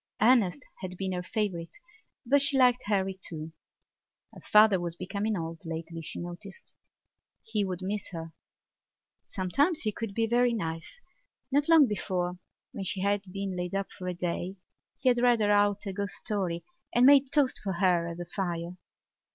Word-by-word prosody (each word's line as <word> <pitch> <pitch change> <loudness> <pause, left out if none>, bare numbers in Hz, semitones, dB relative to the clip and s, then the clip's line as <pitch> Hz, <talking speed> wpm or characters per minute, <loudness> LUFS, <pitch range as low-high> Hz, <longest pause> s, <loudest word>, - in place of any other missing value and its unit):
Ernest 230 0 +4 0.2
had 185 -1 -6
been 190 0 -2
her 180 -1 -2
favourite 180 -4 -3 0.5
but 280 +4 +4
she 280 -1 +2
liked 250 -1 +5
Harry 195 -2 +1
too. 160 -1 -6 0.8
Her - - -12
father 210 -2 +5
was 170 -1 -3
becoming 200 +4 -2
old 165 -1 -5
lately, 165 0 -6
she 160 - -7
noticed; 175 - -9 0.7
he 220 -2 -1
would 185 -1 -4
miss 205 +2 -3
her. 165 -2 -7 0.9
Sometimes 285 - +1
he 215 - 0
could 210 -2 -5
be 225 - +2
very 240 +1 +2
nice. 165 - -5 0.5
Not 285 +3 +2
long 325 -3 +8
before, 180 -3 -2 0.3
when 205 -6 -5
she 190 0 -2
had 200 +1 +1
been 195 -1 -3
laid 180 +1 -3
up 195 0 -2
for 180 - -8
a 180 - -1
day, 175 +2 -3 0.4
he 260 - +2
had 245 -1 +3
read 245 -1 +4
her 210 -1 +2
out 205 0 +3
a 195 - -3
ghost 200 0 -2
story 185 -5 -2 0.3
and 245 +1 +4
made 275 -1 +6
toast 285 -4 +2
for 195 -2 -1
her 175 -2 +2
at 170 0 -6
the 175 - -5
fire. 175 -1 -4
195 Hz, 175 wpm, -29 LUFS, 175-225 Hz, 0.9 s, long